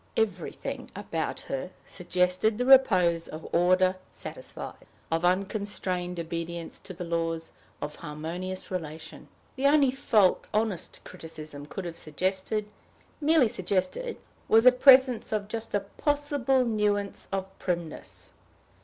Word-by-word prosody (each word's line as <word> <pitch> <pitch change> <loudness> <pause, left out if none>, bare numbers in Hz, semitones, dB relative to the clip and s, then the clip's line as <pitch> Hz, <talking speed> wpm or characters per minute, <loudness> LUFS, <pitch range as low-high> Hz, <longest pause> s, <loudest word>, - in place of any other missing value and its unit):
Everything 200 -6 -2
about - - -3
her 135 +6 -4 0.2
suggested 180 +3 0
the 250 - 0
repose 185 -11 +5
of 155 +1 -8
order 185 +2 +4
satisfied, - - -9 0.2
of 165 +1 +1
unconstrained 185 -1 -1
obedience 170 0 -5
to - - -11
the 180 0 -6
laws 165 -1 -2 0.3
of 150 - -5
harmonious 170 +5 -6
relation. 160 -3 -6 0.3
The 270 +1 +3
only 285 -2 +5
fault 215 -7 +3
honest 210 -5 -1
criticism 155 -4 -9
could 190 +4 -6
have 170 -1 -6
suggested, 190 +7 -1 0.6
merely 305 -3 +5
suggested, 190 - -1 0.3
was 225 +1 +6
the 255 - +9
presence 255 -1 +6
of 210 -2 -1
just 225 0 -3
a 205 - +2
possible 275 +3 0
nuance 210 -3 0
of 195 -1 -1
primness. 170 -3 -5
185 Hz, 120 wpm, -28 LUFS, 170-225 Hz, 0.6 s, the